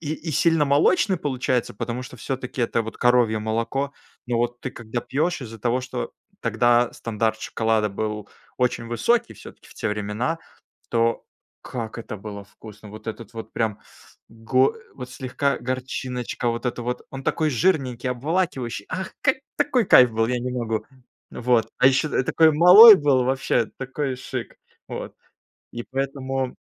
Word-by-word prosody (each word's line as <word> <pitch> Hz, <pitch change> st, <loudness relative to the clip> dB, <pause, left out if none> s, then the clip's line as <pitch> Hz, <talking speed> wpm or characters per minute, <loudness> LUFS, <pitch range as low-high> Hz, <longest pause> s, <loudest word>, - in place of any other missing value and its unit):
и 160 Hz, 0 st, -6 dB
сильно 165 Hz, 0 st, +3 dB
молочный 180 Hz, +7 st, +3 dB
получается, 130 Hz, -6 st, -1 dB
потому 120 Hz, +4 st, -4 dB
что 125 Hz, 0 st, -10 dB
всё-таки 125 Hz, +1 st, -4 dB
это 115 Hz, 0 st, +1 dB
вот 110 Hz, -, -8 dB
коровье 120 Hz, -3 st, +3 dB
молоко, 115 Hz, +6 st, -2 dB, 0.3 s
ну 120 Hz, -2 st, -1 dB
вот 120 Hz, +1 st, -1 dB
ты 130 Hz, -, -5 dB
когда 115 Hz, +1 st, -5 dB
пьёшь, 155 Hz, +4 st, -1 dB
из-за 115 Hz, -2 st, -9 dB
того, 125 Hz, +3 st, 0 dB
что 130 Hz, -, -5 dB, 0.3 s
тогда 120 Hz, 0 st, +3 dB
стандарт 110 Hz, -1 st, -2 dB
шоколада 110 Hz, -2 st, 0 dB
был 105 Hz, +1 st, -4 dB, 0.3 s
очень 125 Hz, -2 st, 0 dB
высокий 120 Hz, -, +1 dB
всё-таки -, -, -14 dB
в -, -, -17 dB
те 110 Hz, -, -2 dB
времена, 105 Hz, +10 st, -2 dB, 0.5 s
то 115 Hz, 0 st, +1 dB, 0.4 s
как 115 Hz, -2 st, -6 dB
это 110 Hz, -2 st, -7 dB
было 100 Hz, 0 st, -8 dB
вкусно! 105 Hz, 0 st, -14 dB
Вот 110 Hz, +2 st, -11 dB
этот 115 Hz, 0 st, -7 dB
вот 115 Hz, -, -8 dB
прям 110 Hz, -3 st, -1 dB, 0.5 s
го 130 Hz, -, +1 dB, 0.2 s
вот 125 Hz, -1 st, -8 dB
слегка 135 Hz, +2 st, -1 dB
горчиночка 125 Hz, -1 st, -3 dB
вот 115 Hz, +2 st, -4 dB
эта 120 Hz, 0 st, -2 dB
вот. 125 Hz, +1 st, -3 dB
Он 135 Hz, 0 st, -7 dB
такой 155 Hz, -2 st, 0 dB
жирненький, 130 Hz, -4 st, +1 dB
обволакивающий. 130 Hz, -, -2 dB
Ах, 190 Hz, 0 st, -4 dB
какой 265 Hz, 0 st, +1 dB
такой 275 Hz, -5 st, +2 dB
кайф 125 Hz, -8 st, +7 dB
был, 115 Hz, 0 st, +1 dB
я 125 Hz, +1 st, -1 dB
не 125 Hz, +1 st, -3 dB
могу! 115 Hz, -3 st, -2 dB, 0.5 s
Вот. 120 Hz, -2 st, +1 dB
А -, -, +3 dB
еще 135 Hz, +3 st, +2 dB
я 130 Hz, -, +1 dB
такой 160 Hz, +4 st, +4 dB
малой 190 Hz, +8 st, +10 dB
был, 140 Hz, -5 st, +2 dB
вообще 130 Hz, -3 st, +1 dB
такой 135 Hz, 0 st, -3 dB
шик, 130 Hz, -, -6 dB, 0.3 s
вот. -, -, -6 dB, 0.6 s
И 120 Hz, 0 st, -6 dB
поэтому, 135 Hz, -1 st, -3 dB
125 Hz, 155 wpm, -23 LUFS, 115-135 Hz, 0.6 s, малой